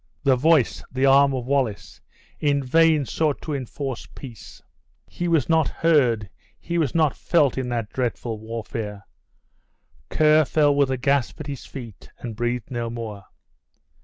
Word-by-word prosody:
The 135 -2 +4
voice, 150 0 +2
the 130 +1 +1
arm 140 +1 +6
of 125 -2 -4
Wallace, 130 -6 -2 0.4
in 145 -2 +1
vain 155 +2 +3
sought 150 +2 -1
to 155 - -4
enforce 135 -2 -5
peace; 120 -6 -11 0.5
he 175 - -4
was 165 -6 +2
not 160 -2 +3
heard, 125 -10 +2 0.3
he 170 0 -2
was 150 -4 0
not 155 -4 +3
felt 150 -7 +2
in 130 -2 -3
the 115 -3 -2
dreadful 120 -3 -3
warfare; 110 -2 -6 1.0
Ker 155 0 +4
fell 145 0 +2
with 140 -1 +2
a 130 - -1
gasp 140 +2 0
at - - -6
his 140 -3 -7
feet, 115 -8 -10
and 115 -3 -7
breathed 120 +1 -3
no 120 -2 -3
more. 110 -4 -7
135 Hz, 155 wpm, -23 LUFS, 120-150 Hz, 1.0 s, arm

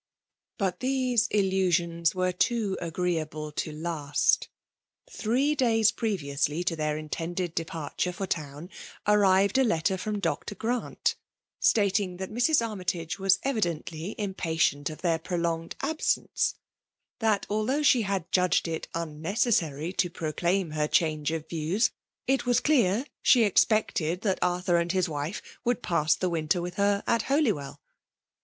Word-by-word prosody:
But 185 -3 -1
these 255 -3 +1
illusions 180 -4 +1
were 185 0 +1
too 205 +1 0
agreeable 160 -3 -2
to 155 - -3
last. 150 -2 0 0.6
Three 270 - 0
days 225 -6 +3
previously 150 -7 -1
to 175 -1 -1
their 155 -1 -1
intended 165 +3 -4
departure 165 +1 -3
for 195 +2 -4
town, 155 0 -5 0.3
arrived 200 +2 +4
a - - +5
letter 190 -4 +1
from 210 +1 -2
Dr; 205 - -2
Grant, 235 +4 -1 0.5
stating 200 -3 +2
that 190 0 -6
Mrs. 240 +2 +2
Armytage 180 -4 -3
was 195 0 +4
evi 270 -5 0
dently 170 +1 -3
impatient 165 -8 0
of 155 - -10
their 165 -2 +2
prolonged 170 -1 -2
absence; 315 +3 0 0.6
that, 220 -3 +1
although 215 +8 0
she 255 -4 +5
had 195 -4 -2
judged 180 -1 +2
it 160 -1 -4
unnecesisary 165 - -1
to 175 - +2
proclaim 170 +2 -1
her 150 -1 0
change 155 -2 +1
of 160 -1 -4
views^ 170 +8 0 0.3
it 260 -2 0
was 245 -1 +4
clear 245 -5 +2 0.2
she 245 -3 +5
expected 185 -5 +2
that 195 -4 0
Arthur 180 0 +1
and 170 +1 0
his 185 -1 +1
wife 150 +4 -4 0.2
would 245 -1 0
pass 155 -2 +2
the 185 - -1
winter 165 +1 0
with 175 +1 -5
her 200 0 +2
at 230 - +2
Holywell. 220 - 0
180 Hz, 140 wpm, -27 LUFS, 165-215 Hz, 0.6 s, a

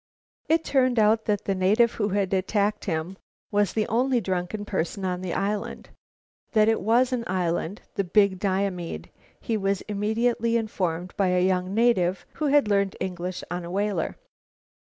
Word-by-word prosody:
It 325 +1 +3
turned 255 -3 +2
out 220 +1 +3
that 205 -2 -1
the 195 - +1
native 210 +5 +3
who 210 -2 -1
had 195 -1 0
attacked 205 +2 0
him 170 +1 -3 0.3
was 205 -2 +2
the 215 -1 +1
only 250 +3 +2
drunken 190 +1 -3
person 190 0 -2
on 180 -1 -2
the 185 -2 -3
island. 205 +1 -3 0.6
That 215 -2 +4
it 225 - +2
was 245 +5 +3
an 240 -2 -1
island, 180 +1 -1
the 200 - 0
Big 195 0 +3
Diomede, 190 -3 -2 0.3
he 225 -3 -1
was 195 -1 0
immediately 230 +3 0
informed 180 -5 -3
by 195 - +2
a 180 0 +2
young 185 +1 0
native 195 -6 +2 0.2
who - - +2
had 285 -5 +4
learned 200 -2 +1
English 180 -1 -4
on 180 0 -3
a 170 - -7
whaler. 195 -2 -1
200 Hz, 165 wpm, -25 LUFS, 185-220 Hz, 0.6 s, That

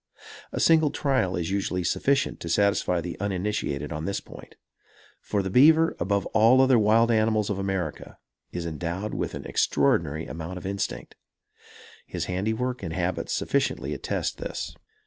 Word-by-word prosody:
A - - -3
single 160 -2 +5
trial 130 -11 0
is 85 0 -2
usually 95 -2 -1
sufficient 135 - +1
to 85 - -6
satisfy 100 -2 +2
the 85 +1 -6
uninitiated 95 -7 -2
on 75 +1 -4
this 100 +1 -1
point; - - -13 0.6
for, 100 -1 -2
the 95 - -3
beaver, 160 - +5
above 100 +2 0
all 115 +4 +6
other 130 -2 +5
wild 115 +2 +4
animals 110 -2 +2
of 100 - -2
America 95 -5 -3 0.3
is 85 -1 -4
endowed 85 +5 -4
with - - -3
an - - -7
extraordinary 75 +2 +1
amount 80 +5 -6
of 90 - -9
instinct. 100 +1 -4 0.9
His - - -3
handiwork 110 +7 -2
and 85 -4 -4
habits 90 +1 -2
sufficiently - - -1
attest - - -3
this. - - -5
100 Hz, 150 wpm, -26 LUFS, 85-110 Hz, 0.9 s, all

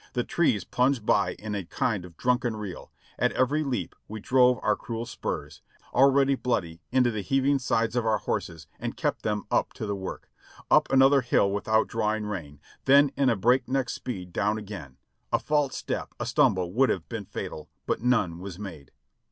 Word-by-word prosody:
The 120 - 0
trees 120 - +1
plunged 125 -3 +1
by - - +2
in 105 0 -6
a 100 -2 -2
kind 100 +2 -2
of 85 -2 -14
drunken 125 -2 +1
reel; 105 -4 -7 0.3
at - - +2
every 145 +5 +1
leap 120 - -3
we 110 +1 -6
drove 125 +2 +4
our 105 - +3
cruel 115 +1 -5
spurs, 115 - -5 0.3
already 135 +1 +5
bloody, 85 -11 -2
into 125 -1 +3
the 110 -2 -3
heaving 135 +5 +2
sides 115 -2 0
of 120 - +1
our 110 -1 +2
horses 80 -2 -4
and - - -4
kept - - -1
them 105 -1 -1
up - - +1
to - - -5
the 100 -1 -2
work; 95 -1 -6 0.4
up - - +5
another 135 +1 +6
hill 110 -5 +2
without 110 +2 +1
drawing 110 -1 -1
rein, 80 -9 -6 0.3
then 140 +1 +6
in 135 -1 +3
a 115 - +3
breakneck 125 +4 +1
speed 90 -8 -6
down 105 +1 +1
again; 95 -11 -8 0.3
a - - +4
false 145 -3 0
step, - - -4
a - - -2
stumble 90 -1 +2
would 130 +4 +4
have - - -2
been 115 -4 -5
fatal, 75 -3 -7 0.2
but - - -1
none 110 -9 +1
was 95 -1 -7
made. 85 -9 -8
110 Hz, 185 wpm, -27 LUFS, 100-130 Hz, 0.4 s, another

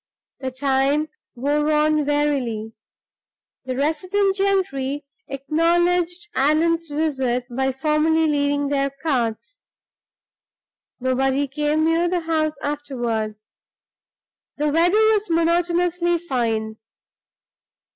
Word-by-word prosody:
The 265 - -3
time 275 +3 +1 0.3
wore 295 +4 0
on 305 -1 +2
wearily. 265 -7 -1 0.9
The 255 -1 -3
resident 370 +8 0
gentry 295 -8 -1 0.2
acknowledged 345 +5 +1
Allan's 325 +5 +2
visit 270 -5 -1
by 265 +1 +1
formally 305 +4 +1
leaving 285 -1 +1
their 275 -1 +1
cards. 275 - -3 1.4
Nobody 265 +2 +1
came 300 +3 0
near 330 +2 +2
the 355 -1 0
house 315 -2 0
afterward; 240 -7 -2 1.2
the 300 +1 +1
weather 335 +4 +3
was 435 -2 +3
monotonously 345 +1 +1
fine. 230 -9 -2
295 Hz, 90 wpm, -22 LUFS, 270-335 Hz, 1.4 s, weather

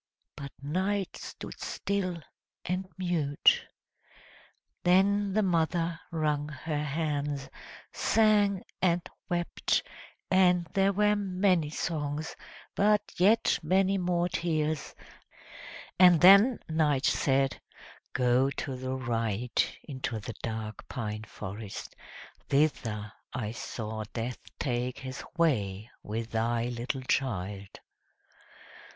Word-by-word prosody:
But 140 -2 -7
Night 190 +6 -1
stood - - -9
still 185 -5 -2 0.4
and 185 +2 -2
mute. 170 -6 +3 1.2
Then 200 +3 +4
the 215 +1 +3
mother 170 -1 +1
wrung 150 -2 0
her 150 +1 -3
hands, 145 -2 -2 0.4
sang 205 -3 +3 0.2
and 175 0 +2 0.2
wept, 175 -1 0 0.5
and 180 -2 +4
there 195 0 +3
were 210 +1 +3
many 185 -5 +1
songs, 150 -1 -3 0.4
but 210 +1 +4 0.2
yet 215 +6 +4
many 190 +4 +2
more 175 -1 +1
tears; 155 -4 -1 1.0
and 180 -3 +8
then 200 +7 +8
Night 150 -4 +1
said, 135 -1 +2 0.5
"Go 125 +2 +3
to 135 -1 -4
the 130 +1 -3
right, 115 -2 -1
into 130 -5 -4
the 115 +2 -6
dark 110 -1 -5
pine 110 -4 -4
forest; 105 0 -7 0.5
thither 110 -8 0 0.2
I 110 -4 -2
saw 110 -1 -5
Death 120 +1 -3 0.2
take 125 -1 -2
his 130 -1 -6
way 110 - +1
with 115 +2 -4
thy 115 +1 0
little 125 +2 -3
child!" 100 -7 -1
150 Hz, 100 wpm, -29 LUFS, 120-180 Hz, 1.2 s, and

